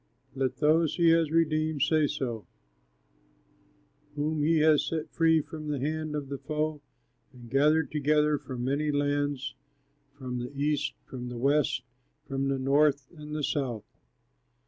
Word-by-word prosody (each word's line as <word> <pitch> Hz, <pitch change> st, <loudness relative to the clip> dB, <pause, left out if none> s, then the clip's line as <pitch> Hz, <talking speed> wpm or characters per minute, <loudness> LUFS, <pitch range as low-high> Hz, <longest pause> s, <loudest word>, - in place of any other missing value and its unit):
Let 130 Hz, -1 st, -1 dB
those 155 Hz, +1 st, +3 dB
he 170 Hz, -2 st, +4 dB
has 165 Hz, -1 st, +4 dB
redeemed 155 Hz, -2 st, +1 dB
say 155 Hz, 0 st, +3 dB
so, 120 Hz, -6 st, -4 dB, 1.7 s
Whom 150 Hz, +1 st, -1 dB
he 160 Hz, +2 st, +3 dB
has 155 Hz, -1 st, +5 dB
set 160 Hz, -2 st, -3 dB
free 160 Hz, -1 st, +4 dB
from 155 Hz, 0 st, -8 dB
the 145 Hz, -2 st, -2 dB
hand 155 Hz, +2 st, -2 dB
of 145 Hz, -2 st, -4 dB
the 140 Hz, 0 st, -5 dB
foe, 155 Hz, 0 st, -2 dB, 0.5 s
And 120 Hz, -3 st, -14 dB
gathered 150 Hz, +3 st, +3 dB
together 150 Hz, 0 st, +2 dB
from 125 Hz, -2 st, -6 dB
many 140 Hz, +4 st, 0 dB
lands, 145 Hz, -1 st, -1 dB, 0.6 s
From 125 Hz, -1 st, -4 dB
the 125 Hz, +2 st, -5 dB
east, 145 Hz, 0 st, 0 dB
from 125 Hz, -1 st, -7 dB
the 125 Hz, -, -6 dB
west, 135 Hz, 0 st, +1 dB, 0.4 s
From 135 Hz, 0 st, -1 dB
the 135 Hz, 0 st, 0 dB
north 140 Hz, 0 st, +2 dB
and 150 Hz, -1 st, -8 dB
the 150 Hz, -, -2 dB
south. 125 Hz, -7 st, -2 dB
145 Hz, 145 wpm, -28 LUFS, 135-155 Hz, 1.7 s, has